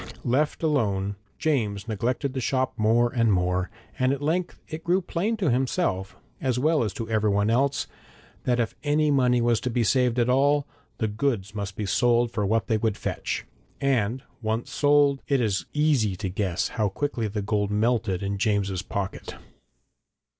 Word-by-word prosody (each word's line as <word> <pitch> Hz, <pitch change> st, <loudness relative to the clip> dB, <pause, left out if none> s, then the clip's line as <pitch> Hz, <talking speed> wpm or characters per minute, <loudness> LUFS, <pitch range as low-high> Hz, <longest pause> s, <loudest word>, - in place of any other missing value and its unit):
Left 145 Hz, +7 st, +1 dB
alone, 100 Hz, -10 st, +1 dB, 0.2 s
James 110 Hz, -9 st, -1 dB
neglected 120 Hz, +5 st, -1 dB
the 130 Hz, -, -2 dB
shop 130 Hz, +1 st, 0 dB
more 120 Hz, +2 st, +2 dB
and 115 Hz, -3 st, +3 dB
more, 90 Hz, 0 st, +1 dB, 0.3 s
and 130 Hz, 0 st, +3 dB
at 140 Hz, -, -1 dB
length 165 Hz, +5 st, -1 dB
it 160 Hz, 0 st, -7 dB
grew 175 Hz, +3 st, +2 dB
plain 195 Hz, +5 st, -2 dB
to 185 Hz, -10 st, +1 dB
himself, 125 Hz, -, 0 dB, 0.3 s
as 130 Hz, -2 st, 0 dB
well 155 Hz, +4 st, +2 dB
as 105 Hz, -, -1 dB
to 115 Hz, +1 st, -5 dB
everybody 105 Hz, -1 st, +2 dB
else, 140 Hz, +3 st, +1 dB, 0.6 s
that 125 Hz, -1 st, +2 dB
if 115 Hz, -2 st, 0 dB
any 150 Hz, +1 st, +2 dB
money 125 Hz, -3 st, +3 dB
was 120 Hz, -1 st, +2 dB
to 125 Hz, -, -2 dB
be 120 Hz, 0 st, +1 dB
saved 125 Hz, +1 st, +2 dB
at 120 Hz, -1 st, +3 dB
all, 140 Hz, +3 st, +3 dB, 0.3 s
the 110 Hz, -, 0 dB
goods 105 Hz, -2 st, -1 dB
must 100 Hz, -2 st, -4 dB
be 105 Hz, -, -3 dB
sold 120 Hz, +3 st, +2 dB
for 105 Hz, -4 st, -1 dB
what 110 Hz, -1 st, +1 dB
they 110 Hz, -, +1 dB
would 110 Hz, -1 st, -1 dB
fetch. -, -, -3 dB, 0.3 s
And 130 Hz, -3 st, 0 dB, 0.2 s
once 110 Hz, +1 st, -2 dB
sold, 145 Hz, -1 st, +3 dB
it 140 Hz, -2 st, +2 dB
is 100 Hz, -7 st, 0 dB
easy 145 Hz, -10 st, +2 dB
to 95 Hz, +1 st, -4 dB
guess 90 Hz, -1 st, -1 dB
how 110 Hz, -4 st, 0 dB
quickly 120 Hz, 0 st, -2 dB
the 105 Hz, 0 st, -3 dB
gold 105 Hz, 0 st, 0 dB
melted 105 Hz, -3 st, +1 dB
in 100 Hz, 0 st, -2 dB
James's 100 Hz, -3 st, 0 dB
pocket. 100 Hz, 0 st, -5 dB
120 Hz, 175 wpm, -25 LUFS, 105-140 Hz, 0.6 s, and